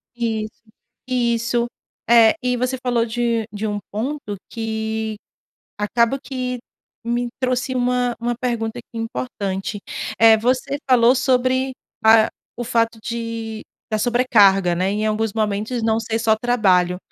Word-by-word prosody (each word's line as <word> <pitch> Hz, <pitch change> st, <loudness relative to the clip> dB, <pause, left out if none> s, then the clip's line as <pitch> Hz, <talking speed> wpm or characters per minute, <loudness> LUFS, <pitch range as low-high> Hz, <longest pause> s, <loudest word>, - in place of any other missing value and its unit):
Isso, 220 Hz, -2 st, -3 dB, 0.4 s
isso. 235 Hz, -1 st, +1 dB, 0.4 s
É, 230 Hz, -2 st, +7 dB
e 250 Hz, 0 st, +1 dB
você 255 Hz, +2 st, -1 dB
falou 240 Hz, -2 st, +1 dB
de 230 Hz, -1 st, -1 dB
de 210 Hz, +1 st, -3 dB
um 205 Hz, -1 st, -2 dB
ponto 220 Hz, -1 st, -4 dB
que 220 Hz, -1 st, -3 dB, 0.6 s
acabou 235 Hz, +5 st, +1 dB
que 255 Hz, -2 st, -4 dB, 0.5 s
me 240 Hz, +1 st, -1 dB
trouxe 255 Hz, 0 st, 0 dB
uma 245 Hz, -1 st, +1 dB
uma 240 Hz, +1 st, -1 dB
pergunta 235 Hz, -2 st, -2 dB
aqui 240 Hz, -, -12 dB
importante. 205 Hz, -4 st, -3 dB, 0.4 s
Eh, 225 Hz, -1 st, +7 dB
você 255 Hz, +5 st, 0 dB
falou 245 Hz, -1 st, +6 dB
sobre 260 Hz, 0 st, +1 dB, 0.3 s
a 220 Hz, 0 st, +7 dB, 0.3 s
o 240 Hz, -, -4 dB
fato 230 Hz, -1 st, 0 dB
de 230 Hz, -1 st, -4 dB, 0.3 s
da 215 Hz, -, 0 dB
sobrecarga, 210 Hz, -6 st, +4 dB
né, 185 Hz, +3 st, 0 dB
em 210 Hz, +2 st, -1 dB
alguns 215 Hz, 0 st, 0 dB
momentos, 215 Hz, +2 st, -1 dB
não 225 Hz, 0 st, +1 dB
ser 225 Hz, 0 st, -2 dB
só 225 Hz, -1 st, +3 dB
trabalho. 190 Hz, -7 st, +2 dB
230 Hz, 135 wpm, -21 LUFS, 220-245 Hz, 0.6 s, É